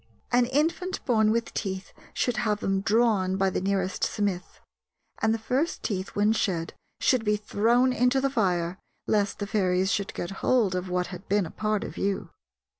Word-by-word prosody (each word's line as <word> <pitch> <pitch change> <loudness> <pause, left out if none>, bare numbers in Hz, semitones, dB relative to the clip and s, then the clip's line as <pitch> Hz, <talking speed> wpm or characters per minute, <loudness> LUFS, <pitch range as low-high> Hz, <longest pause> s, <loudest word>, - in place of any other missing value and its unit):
An 245 0 +4
infant 330 +7 -1
born 220 -4 +3
with 230 +1 0
teeth 190 -3 -4 0.2
should 245 -1 -1
have 210 -2 0
them 195 -2 0
drawn 210 -3 +2
by 195 -1 +2
the - - -1
nearest 190 -1 -1
smith, 200 -4 -2 0.6
and 220 - +3
the 225 - +1
first 260 +8 -1
teeth 190 -3 -3
when 210 +2 +3
shed 175 -7 -1 0.3
should 255 -4 +2
be 210 -1 +2
thrown 235 +5 +2
into 250 +2 +3
the 275 0 0
fire, 180 -6 0 0.3
lest 205 -2 +1
the 205 - -3
fairies 190 -2 +1
should 200 -3 -2
get 175 - -4
hold 230 -7 +3
of 180 0 -3
what 180 0 0
had 180 +2 -10
been 200 -4 +1
part 215 -1 -1
of - - -7
you. 195 0 -2
210 Hz, 180 wpm, -27 LUFS, 190-235 Hz, 0.6 s, An